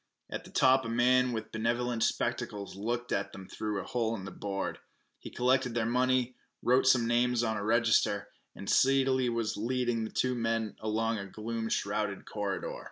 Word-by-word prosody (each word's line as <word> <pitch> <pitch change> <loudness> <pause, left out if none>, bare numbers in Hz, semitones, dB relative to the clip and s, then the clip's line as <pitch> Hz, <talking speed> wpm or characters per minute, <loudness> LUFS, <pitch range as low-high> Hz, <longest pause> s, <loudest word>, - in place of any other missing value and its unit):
At - - -5
the - - -12
top 130 0 +4
a 115 - -4
man 125 +2 +3
with 110 -2 -4
benevolent 120 +1 -1
spectacles 100 -2 -2
looked 120 +4 -3
at 100 - -1
them 95 -1 -9
through 105 -2 -3
a - - -4
hole 115 0 -1
in 95 -3 -7
a - - -7
board. 100 0 -4 0.4
He - - -8
collected 125 -1 +1
their 115 -2 +1
money, 125 +1 +1 0.3
wrote 130 +2 +4
some 125 -3 +5
names 120 0 +2
on 110 -1 0
a 105 - -3
register, 110 -2 +2 0.3
and 100 - -9
speedily 130 0 +3
was 115 -2 -1
leading 120 0 0
the 110 - -4
two 130 0 0
men 115 -2 -1
along 110 +1 -1
a 100 - -6
gloom 115 +3 -4
shrouded 100 -1 -1
corridor. 105 -2 -3
115 Hz, 180 wpm, -30 LUFS, 110-125 Hz, 0.4 s, some